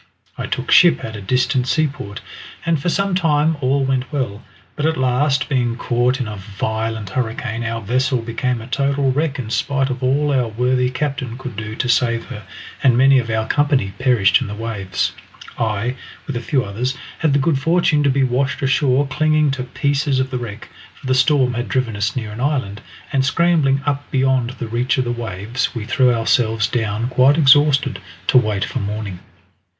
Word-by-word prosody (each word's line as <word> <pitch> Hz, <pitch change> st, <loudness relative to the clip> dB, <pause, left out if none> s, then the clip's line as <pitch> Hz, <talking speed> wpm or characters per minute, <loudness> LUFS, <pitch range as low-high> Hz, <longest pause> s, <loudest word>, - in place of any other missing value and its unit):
I -, -, -5 dB
took -, -, -3 dB
ship 70 Hz, -, +6 dB
at 110 Hz, -, -7 dB
a 105 Hz, -, -7 dB
distant 125 Hz, +4 st, +1 dB
seaport, 135 Hz, -9 st, -2 dB, 0.4 s
and 165 Hz, -4 st, +1 dB
for 175 Hz, -, 0 dB
some 195 Hz, +2 st, 0 dB
time 160 Hz, -3 st, +2 dB
all 135 Hz, +1 st, +1 dB
went 130 Hz, -1 st, -1 dB
well, 125 Hz, -7 st, -3 dB, 0.3 s
but 150 Hz, +1 st, 0 dB
at 160 Hz, -, 0 dB
last, 130 Hz, +1 st, +1 dB
being 120 Hz, -4 st, 0 dB
caught 125 Hz, +2 st, 0 dB
in 125 Hz, -, -2 dB
a 105 Hz, -1 st, -6 dB
violent 110 Hz, +1 st, -4 dB
hurricane, 115 Hz, -1 st, -3 dB
our 115 Hz, 0 st, -3 dB
vessel 130 Hz, +4 st, 0 dB
became 120 Hz, +1 st, -2 dB
a -, -, -8 dB
total 140 Hz, +2 st, 0 dB
wreck 145 Hz, +1 st, -1 dB
in 115 Hz, -5 st, -5 dB
spite 135 Hz, 0 st, 0 dB
of 130 Hz, 0 st, -5 dB
all 140 Hz, +3 st, +1 dB
our 125 Hz, -3 st, +1 dB
worthy 125 Hz, +3 st, 0 dB
captain 130 Hz, -2 st, -3 dB
could 130 Hz, -3 st, -7 dB
do 110 Hz, +1 st, -5 dB
to 130 Hz, -, -2 dB
save 115 Hz, -1 st, +1 dB
her, -, -, -7 dB, 0.4 s
and 125 Hz, -4 st, +4 dB
many 135 Hz, +1 st, +6 dB
of 115 Hz, -2 st, -4 dB
our 110 Hz, 0 st, -1 dB
company 140 Hz, -9 st, +1 dB
perished 120 Hz, -5 st, +3 dB
in 125 Hz, -, -3 dB
the 105 Hz, -, -6 dB
waves. 105 Hz, -4 st, -2 dB, 0.5 s
I, 110 Hz, +1 st, -1 dB, 0.3 s
with 140 Hz, -, -5 dB
a 120 Hz, -, -2 dB
few 135 Hz, -1 st, 0 dB
others, 125 Hz, +7 st, -3 dB, 0.2 s
had 155 Hz, -4 st, +2 dB
the -, -, +4 dB
good 140 Hz, 0 st, +1 dB
fortune 160 Hz, 0 st, +2 dB
to 145 Hz, -, +3 dB
be 135 Hz, 0 st, +2 dB
washed 135 Hz, +3 st, 0 dB
ashore 135 Hz, 0 st, +2 dB
clinging 155 Hz, +1 st, +2 dB
to 130 Hz, -1 st, -3 dB
pieces 140 Hz, +1 st, 0 dB
of 130 Hz, 0 st, -1 dB
the 125 Hz, -, -2 dB
wreck, 110 Hz, -2 st, -8 dB, 0.3 s
for -, -, -16 dB
the 130 Hz, -, +1 dB
storm 130 Hz, -1 st, +3 dB
had 120 Hz, +1 st, -3 dB
driven 130 Hz, -4 st, -1 dB
us 105 Hz, +4 st, -1 dB
near 110 Hz, -5 st, -4 dB
an 110 Hz, +3 st, -7 dB
island, 130 Hz, -8 st, -1 dB, 0.3 s
and 135 Hz, -1 st, +2 dB
scrambling 140 Hz, -1 st, +2 dB
up 145 Hz, -1 st, -2 dB
beyond 130 Hz, -3 st, +1 dB
the 120 Hz, -, -5 dB
reach 120 Hz, +3 st, 0 dB
of 130 Hz, -, +2 dB
the 120 Hz, -, -2 dB
waves 115 Hz, +1 st, -3 dB
we 110 Hz, -3 st, -4 dB
threw 125 Hz, +2 st, +3 dB
ourselves 115 Hz, -1 st, +1 dB
down 110 Hz, 0 st, -1 dB
quite 130 Hz, +3 st, +4 dB
exhausted, 145 Hz, -2 st, +4 dB, 0.3 s
to 130 Hz, -, +5 dB
wait 105 Hz, -4 st, -1 dB
for -, -, -4 dB
morning. 100 Hz, -3 st, -4 dB
130 Hz, 195 wpm, -19 LUFS, 115-140 Hz, 0.5 s, ship